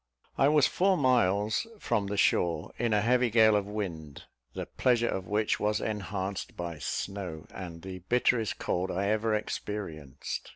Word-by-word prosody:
I 135 Hz, -, +4 dB
was 150 Hz, -1 st, +5 dB
four 190 Hz, 0 st, +2 dB
miles 110 Hz, -, +2 dB
from 110 Hz, -, -1 dB
the 100 Hz, +1 st, -3 dB
shore, 85 Hz, -4 st, +2 dB
in 120 Hz, -2 st, +1 dB
a 105 Hz, -1 st, +3 dB
heavy 125 Hz, +2 st, +3 dB
gale 110 Hz, -1 st, +5 dB
of 100 Hz, -1 st, 0 dB
wind, 85 Hz, -9 st, -5 dB, 0.3 s
the -, -, -3 dB
pleasure 120 Hz, -2 st, +1 dB
of 95 Hz, -4 st, -3 dB
which 105 Hz, +1 st, +1 dB
was 105 Hz, 0 st, +1 dB
enhanced 100 Hz, -2 st, -4 dB
by 85 Hz, -3 st, -5 dB
snow, 90 Hz, 0 st, -4 dB
and 85 Hz, -3 st, -8 dB
the 95 Hz, -1 st, -6 dB
bitterest 115 Hz, +3 st, +1 dB
cold 90 Hz, +2 st, -1 dB
I 100 Hz, +3 st, -1 dB
ever 110 Hz, 0 st, +1 dB
experienced. 85 Hz, -, -5 dB
105 Hz, 160 wpm, -29 LUFS, 90-115 Hz, 0.3 s, was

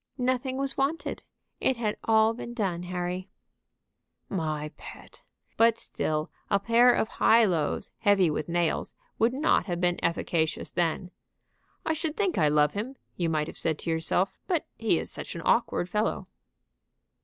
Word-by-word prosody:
"Nothing 255 Hz, +1 st, 0 dB
was 275 Hz, 0 st, -1 dB
wanted; 280 Hz, +5 st, -1 dB, 0.4 s
it 260 Hz, -, +1 dB
had 215 Hz, -3 st, -1 dB
all 220 Hz, 0 st, +4 dB
been 240 Hz, 0 st, -7 dB
done, 190 Hz, -7 st, -1 dB
Harry." 180 Hz, +1 st, -4 dB, 1.0 s
"My 155 Hz, -4 st, -2 dB
pet! -, -, -12 dB, 0.4 s
But 230 Hz, 0 st, +5 dB
still 155 Hz, -6 st, -2 dB, 0.2 s
a 200 Hz, -, +3 dB
pair 235 Hz, +4 st, +5 dB
of 220 Hz, -, +1 dB
high 225 Hz, +1 st, +4 dB
lows 165 Hz, -7 st, -1 dB
heavy 200 Hz, -4 st, +4 dB
with 150 Hz, -, -3 dB
nails 170 Hz, -1 st, 0 dB, 0.2 s
would 230 Hz, +2 st, +4 dB
not 270 Hz, -, +2 dB
have 175 Hz, -2 st, -2 dB
been 175 Hz, -1 st, +1 dB
efficacious 165 Hz, -1 st, 0 dB
then. 175 Hz, +1 st, -1 dB, 0.7 s
I 320 Hz, -, +1 dB
should 315 Hz, -1 st, -3 dB
think 395 Hz, -4 st, +1 dB
I 155 Hz, -, +4 dB
love 150 Hz, 0 st, +3 dB
him, 230 Hz, +7 st, -4 dB, 0.2 s
you 170 Hz, -2 st, 0 dB
might 155 Hz, -1 st, +1 dB
have -, -, -8 dB
said 160 Hz, -2 st, 0 dB
to 165 Hz, -, -3 dB
yourself, 165 Hz, +4 st, 0 dB
but 345 Hz, -5 st, 0 dB
he 220 Hz, -6 st, +2 dB
is -, -, -4 dB
such -, -, -5 dB
an 170 Hz, -, -6 dB
awkward 230 Hz, -6 st, +2 dB
fellow." 210 Hz, +4 st, -1 dB
195 Hz, 160 wpm, -28 LUFS, 170-240 Hz, 1.0 s, But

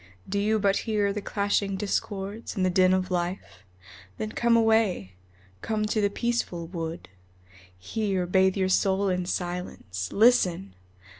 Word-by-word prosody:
Do 200 Hz, +1 st, -1 dB
you 215 Hz, +2 st, +2 dB
but 200 Hz, -1 st, +2 dB
hear 205 Hz, -2 st, +1 dB
the 210 Hz, -, -4 dB
clashing 200 Hz, -1 st, -1 dB
discords 200 Hz, +2 st, -3 dB
and 190 Hz, -3 st, +1 dB
the 185 Hz, -, +2 dB
din 185 Hz, 0 st, +4 dB
of 185 Hz, 0 st, 0 dB
life? 180 Hz, +1 st, -3 dB, 0.6 s
Then 110 Hz, 0 st, -4 dB
come 235 Hz, -, +3 dB
away, 220 Hz, -, +2 dB, 0.5 s
come 215 Hz, -1 st, -1 dB
to 215 Hz, 0 st, 0 dB
the 205 Hz, -, +2 dB
peaceful 220 Hz, -6 st, -2 dB
wood, 165 Hz, -1 st, -6 dB, 0.7 s
Here 190 Hz, -, -2 dB
bathe 190 Hz, +2 st, +3 dB
your 190 Hz, -1 st, +1 dB
soul 190 Hz, +1 st, +2 dB
in 180 Hz, -1 st, -1 dB
silence. 175 Hz, -, -4 dB
Listen! 190 Hz, -, +3 dB
195 Hz, 145 wpm, -26 LUFS, 180-210 Hz, 0.7 s, din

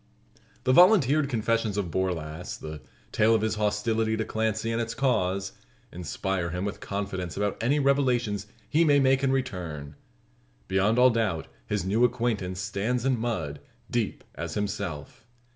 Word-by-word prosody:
The 130 Hz, -, +3 dB
volunteered 155 Hz, -, +6 dB
confessions 115 Hz, -3 st, 0 dB
of 95 Hz, -5 st, -2 dB
Borlasse 85 Hz, -3 st, -3 dB
the 75 Hz, -1 st, -8 dB, 0.3 s
tale 110 Hz, +1 st, +4 dB
of 110 Hz, -, +1 dB
his 110 Hz, -1 st, +1 dB
hostility 110 Hz, +1 st, 0 dB
to 110 Hz, -, -1 dB
Clancy, 110 Hz, +1 st, -1 dB
and 115 Hz, +1 st, 0 dB
its 115 Hz, 0 st, -3 dB
cause 100 Hz, -7 st, 0 dB, 0.4 s
inspire 90 Hz, +1 st, -2 dB
him 90 Hz, +3 st, -3 dB
with 100 Hz, -, -4 dB
confidence 100 Hz, -3 st, -4 dB
about 100 Hz, 0 st, 0 dB
any 135 Hz, +6 st, +2 dB
revelations 125 Hz, -7 st, +1 dB, 0.2 s
he 160 Hz, +3 st, +3 dB
may 145 Hz, -3 st, +5 dB
make 135 Hz, 0 st, +3 dB
in 135 Hz, -, +3 dB
return. 85 Hz, -, -3 dB, 0.7 s
Beyond 100 Hz, +4 st, +2 dB
all 125 Hz, 0 st, +7 dB
doubt 110 Hz, -8 st, -1 dB, 0.2 s
his 105 Hz, -2 st, -1 dB
new 105 Hz, +5 st, +2 dB
acquaintance 115 Hz, -7 st, 0 dB
stands 105 Hz, +6 st, -1 dB
in 130 Hz, -3 st, +2 dB
mud, 90 Hz, -12 st, -2 dB, 0.3 s
deep -, -, -1 dB
as -, -, -5 dB
himself. 100 Hz, -6 st, -4 dB
110 Hz, 150 wpm, -27 LUFS, 95-120 Hz, 0.7 s, all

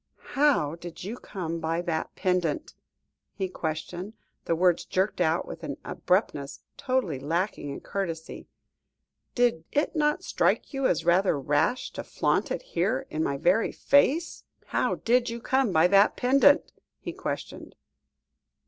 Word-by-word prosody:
"How 270 Hz, -, +3 dB
did 170 Hz, 0 st, -9 dB
you 210 Hz, +6 st, -4 dB
come 170 Hz, -8 st, -5 dB
by 165 Hz, +1 st, -1 dB
that 165 Hz, -3 st, -3 dB
pendant?" 180 Hz, -5 st, -1 dB, 0.6 s
he 190 Hz, -, -2 dB
questioned, 175 Hz, +4 st, -5 dB, 0.3 s
the 165 Hz, -, +1 dB
words 175 Hz, 0 st, +3 dB
jerked 190 Hz, 0 st, -1 dB
out 160 Hz, 0 st, +1 dB
with -, -, -8 dB
an -, -, -4 dB
abruptness 150 Hz, -7 st, -1 dB
totally 255 Hz, -, -1 dB
lacking 165 Hz, +2 st, -2 dB
in 140 Hz, -, -6 dB
courtesy. 165 Hz, -5 st, -5 dB, 0.9 s
"Did 240 Hz, -10 st, +2 dB
it 295 Hz, +4 st, 0 dB
not 300 Hz, -1 st, +1 dB
strike -, -, 0 dB
you 270 Hz, -1 st, +1 dB
as 170 Hz, -, 0 dB
rather 175 Hz, -3 st, +3 dB
rash 145 Hz, -, 0 dB
to -, -, -6 dB
flaunt -, -, 0 dB
it -, -, -3 dB
here, 270 Hz, -, 0 dB
in 155 Hz, -, -1 dB
my 140 Hz, -2 st, -1 dB
very 180 Hz, +9 st, +2 dB
face?" 285 Hz, +4 st, +2 dB, 0.2 s
[Illustration: -, -, -32 dB
"'How -, -, +1 dB
did 245 Hz, +1 st, +2 dB
you 235 Hz, 0 st, -5 dB
come 260 Hz, -1 st, +1 dB
by 160 Hz, -1 st, +4 dB
that 200 Hz, +1 st, +5 dB
pendant?' 275 Hz, +3 st, +4 dB, 0.3 s
he -, -, -6 dB
questioned. -, -, -6 dB
180 Hz, 150 wpm, -27 LUFS, 160-245 Hz, 0.9 s, that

